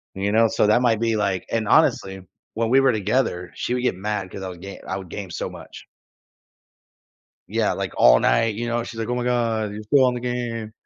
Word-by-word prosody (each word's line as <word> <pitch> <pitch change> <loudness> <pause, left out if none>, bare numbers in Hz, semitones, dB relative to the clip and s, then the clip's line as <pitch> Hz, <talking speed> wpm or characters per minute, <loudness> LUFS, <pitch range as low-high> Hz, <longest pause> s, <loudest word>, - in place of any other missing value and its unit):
And 95 - -5
you 100 - +1
know, 115 +1 +4
so 105 - +1
that 115 +4 +4
might 115 -3 +2
be, 115 -1 +1
like 95 -3 -1
and, 110 -2 -1
honestly, 95 0 +2 0.3
when 115 0 -1
we 130 +3 +5
were 135 -2 +3
together, 105 -4 -1
she 125 - -2
would 125 - -1
get 125 - +1
mad, 100 -1 -4
'cause 95 - -8
I - - -4
was 90 -1 -10
ga 100 +2 -9
I 95 - -3
would 95 -3 -9
game 100 -3 -6
so - - -4
much. - - -12 1.6
Yeah, - - 0
like, - - -4
all - - +6
night, 105 - +2
you 120 +2 -3
know, 120 0 0
and 120 - -5
she's 115 - -8
like, 110 - -3
"Oh 125 - -1
my 125 - -2
god. 115 -4 0
You're 105 +1 -7
still 130 +5 +4
on 125 - +2
the - - -3
game." 120 -3 -4
110 Hz, 245 wpm, -22 LUFS, 100-120 Hz, 1.6 s, all